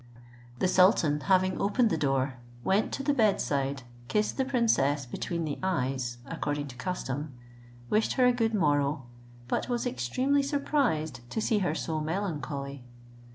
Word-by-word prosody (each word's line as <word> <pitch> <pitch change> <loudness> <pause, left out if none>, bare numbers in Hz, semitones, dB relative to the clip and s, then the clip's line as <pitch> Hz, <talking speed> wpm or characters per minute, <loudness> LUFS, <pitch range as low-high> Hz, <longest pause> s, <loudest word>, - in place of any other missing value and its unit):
The 185 - +1
sultan 180 -6 +4
having 185 +2 +2
opened 225 +3 +2
the - - +2
door, 135 -2 0 0.3
went 200 +3 +2
to 275 - -3
the 290 +1 +2
bed 215 -7 +3
side, 140 -1 -1 0.2
kissed 210 - 0
the 265 - 0
princess 185 - +2
between 170 +7 -3
the 145 - -4
eyes, 130 -9 -1
according 145 -3 -3
to 125 - -10
custom, 145 -1 -4 0.5
wishing 215 - +1
her 255 - +5
a 250 - +5
good 225 -2 +1
morrow, 145 -6 +1 0.4
but 130 - -1
was 240 -1 -1
extremely 255 - +1
surprised 275 - 0
to - - -2
see 220 0 +1
her 180 -5 0
so 160 -1 -2
melancholy. 150 -6 -3
160 Hz, 155 wpm, -29 LUFS, 140-220 Hz, 0.5 s, her